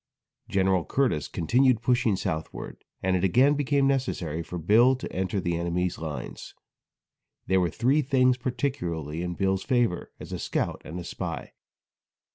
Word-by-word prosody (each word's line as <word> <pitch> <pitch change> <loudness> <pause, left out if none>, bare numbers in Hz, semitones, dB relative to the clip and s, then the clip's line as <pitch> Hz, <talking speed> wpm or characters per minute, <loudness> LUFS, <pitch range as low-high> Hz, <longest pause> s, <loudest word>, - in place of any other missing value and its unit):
Gen. 95 -2 +2
Curtis 125 - 0
continued 125 +6 +2
pushing 120 -3 +2
southward, 80 -4 -5 0.2
and 95 0 +2
it 90 - 0
again 125 +10 +5
became 145 -1 +1
necessary 125 - -1
for 90 +2 -6
Bill 110 +10 +5
to 130 - -7
enter 95 +1 -1
the 85 -2 -1
enemy's 85 +1 -1
lines. 75 -6 -6 0.9
There 95 0 +3
were 90 - +1
three 130 - +2
things 130 -2 +3
particularly 120 - -3
in 90 0 -3
Bill's 95 0 +1
favor 120 -8 0
as - - -9
a - - -3
scout - - -2
and 85 +2 -7
spy. - - -5
95 Hz, 145 wpm, -27 LUFS, 85-130 Hz, 0.9 s, again